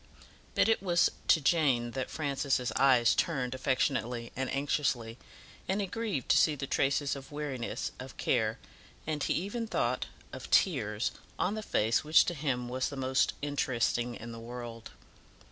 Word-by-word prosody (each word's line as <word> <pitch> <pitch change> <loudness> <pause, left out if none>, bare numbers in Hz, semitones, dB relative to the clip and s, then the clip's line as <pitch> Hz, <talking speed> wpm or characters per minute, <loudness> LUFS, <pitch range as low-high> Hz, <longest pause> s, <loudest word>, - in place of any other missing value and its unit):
But - - +4
it 225 -3 +3
was 175 -3 +3 0.2
to 160 - +6
Jane 135 -6 +2
that 130 +1 -3
Francis' 140 -4 -1
eyes 125 -4 +5
turned 130 -7 0
affectionately 130 -2 -1
and 130 0 -2
anxiously, 135 -4 -1 0.5
and 195 +2 +1
he 200 - 0
grieved 205 - -3
to - - +6
see 155 - +4
the 140 - -4
traces 140 +1 +1
of 135 +1 -10
weariness, 145 -5 -3
of - - -9
care, - - +1 0.5
and 155 -1 -2
he - - +1
even 215 +6 -2
thought, - - 0 0.3
of - - -8
tears, - - +2 0.3
on 185 - 0
the 215 - -3
face 115 - +1
which 155 +1 +6
to 175 - -1
him 135 -5 -2
was 130 +1 -1
the 140 - -7
most 130 0 +1
interesting 125 -4 0
in 115 +1 -8
the 115 - -8
world. 115 -1 -8
135 Hz, 160 wpm, -31 LUFS, 125-155 Hz, 0.5 s, to